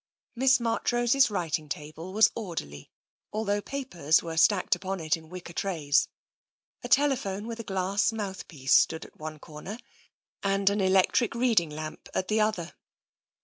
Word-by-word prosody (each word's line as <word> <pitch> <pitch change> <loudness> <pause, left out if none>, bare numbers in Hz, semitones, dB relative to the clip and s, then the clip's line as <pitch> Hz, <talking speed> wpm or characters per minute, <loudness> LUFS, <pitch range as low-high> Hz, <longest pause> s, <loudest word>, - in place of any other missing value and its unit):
Miss 260 +2 +4
Marchrose's 240 +3 +2
writing 165 -6 -2
table 155 +5 -6
was 220 +2 +5
orderly, 160 - -6 0.5
al 220 - 0
though 205 0 0
papers 180 - 0
were 165 -1 -5
stacked 180 +3 +4
upon 190 +2 -3
it 160 +2 +1
in 160 -1 -13
wicker 180 -1 -9
trays. 160 -7 +1 0.8
A - - -4
telephone 245 -9 +2
with 230 0 -6
a - - -4
glass 195 +2 0
mouthpiece 190 -10 -3
stood 160 - +4
at - - -18
one 155 0 -6
corner 155 +7 -9 0.6
and 195 0 +2
an 205 0 0
electric 190 +5 +3
reading 230 -9 +2
lamp 155 +1 -7
at 185 - -1
the 215 0 +2
other. 200 -6 -1
190 Hz, 150 wpm, -28 LUFS, 160-220 Hz, 0.8 s, was